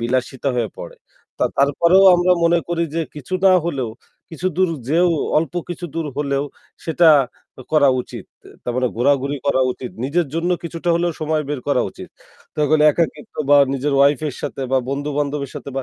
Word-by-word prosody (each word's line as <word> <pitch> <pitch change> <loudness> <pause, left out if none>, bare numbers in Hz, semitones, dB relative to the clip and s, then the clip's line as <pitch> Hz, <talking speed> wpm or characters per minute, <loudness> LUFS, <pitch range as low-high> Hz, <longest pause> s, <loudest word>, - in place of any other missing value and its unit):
বিলাসিতা 130 +3 -1
হয়ে 115 -4 -1
পড়ে। - - -9 0.6
তারপরেও 170 +7 +4
আমরা 175 +1 +3
মনে 170 +1 +4
করি 170 -1 -1
যে 165 - 0
কিছু 150 +5 -6
না 190 - +7
হলেও 135 -8 -2 0.4
কিছু 170 +2 -4
দূর 185 -1 +3 0.2
যেয়েও 170 +4 +3 0.3
অল্প 165 +2 -3
কিছু 175 0 -6
দূর 165 -2 -2
হলেও 140 -1 -1 0.4
সেটা 165 +1 +4 0.6
করা 150 -3 +5
উচিত। - - -9 0.4
তার 125 - -3
মানে 125 0 +1
ঘোরাঘুরি 140 +3 +1
করা 140 -2 +2
উচিত। 125 0 -8
নিজের 165 +5 0
জন্য 170 +2 -1
কিছুটা 170 +1 -5
হলেও 170 0 0
সময় 155 0 0
বের 145 -3 -3
করা - - +2
উচিত। - - -11 0.5
তাহলে 150 0 +2
একাকিত্ব 170 +8 -3 0.2
বা 145 - +8 0.2
নিজের 140 +2 -1
ওয়াইফের 140 0 +2
সাথে, 135 - -4
বা 135 - +4
বন্ধুবান্ধবের 145 0 -2
সাথে, 140 - -7
বা 135 - -1
150 Hz, 165 wpm, -20 LUFS, 140-170 Hz, 0.6 s, বা